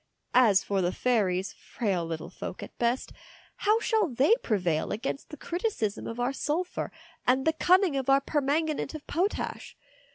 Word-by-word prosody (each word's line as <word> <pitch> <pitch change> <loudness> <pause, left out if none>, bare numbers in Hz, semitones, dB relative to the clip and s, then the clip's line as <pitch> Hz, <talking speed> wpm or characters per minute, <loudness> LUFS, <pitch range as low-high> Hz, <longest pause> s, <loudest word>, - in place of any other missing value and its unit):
As 220 -6 +5
for 195 -1 0
the 175 0 +1
fairies, 195 -6 0
frail 195 -7 -2
little 165 -1 -5
folk - - -7
at - - -10
best, 240 +2 0 0.4
how 425 +2 +3
shall 440 -4 +2
they 270 - +3
prevail 180 -8 0
against 255 +6 -4
the 300 - -9
criticism 340 - -2
of 230 +1 -6
our 245 +2 0
sulphur 320 +6 -2 0.4
and 260 +1 +3
the 320 - +3
cunning 360 0 +4
of 270 0 -1
our 270 0 +6
permanganate 295 +2 -1
of 305 - -8
potash? 370 +6 -2
265 Hz, 160 wpm, -28 LUFS, 205-320 Hz, 0.4 s, our